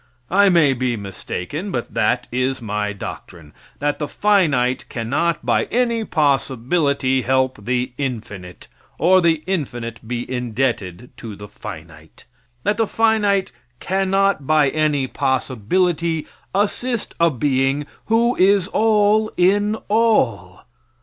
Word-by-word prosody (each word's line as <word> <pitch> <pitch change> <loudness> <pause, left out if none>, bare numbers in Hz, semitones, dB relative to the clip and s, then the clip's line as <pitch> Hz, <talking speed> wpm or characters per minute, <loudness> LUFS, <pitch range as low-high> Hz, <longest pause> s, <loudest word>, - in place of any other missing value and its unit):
I 200 +2 +5
may 160 -6 +4
be 125 -2 -1
mistaken, 100 - -5
but 120 -10 -4
that - - +1
is 130 +2 -1
my 105 -2 -2
doctrine 85 -6 -9 0.2
that 145 0 -1
the 150 - -2
finite 150 -13 +1
cannot 140 +8 -1
by - - +2
any 235 -2 0
possibility 140 - +1
help 130 -4 0
the 125 +1 -1
infinite, 105 -9 -6 0.3
or 185 +3 +4
the 165 -3 +2
infinite 120 - -3
be 120 0 -3
indebted 125 -4 -2
to 110 -3 -8
the 105 +1 -10
finite; 80 -5 -11 0.4
that 205 - +1
the 225 -1 +1
finite 210 - +1 0.3
cannot 195 -4 0
by 155 -3 +4
any 150 -3 +1
possibility 155 - 0 0.3
assist 225 +4 -1
a 170 0 +5
being 135 +1 0 0.2
who 235 +2 +2
is 195 -1 +4
all 215 0 +3
in 205 +4 +3
all. 125 - +1
145 Hz, 120 wpm, -20 LUFS, 120-195 Hz, 0.4 s, I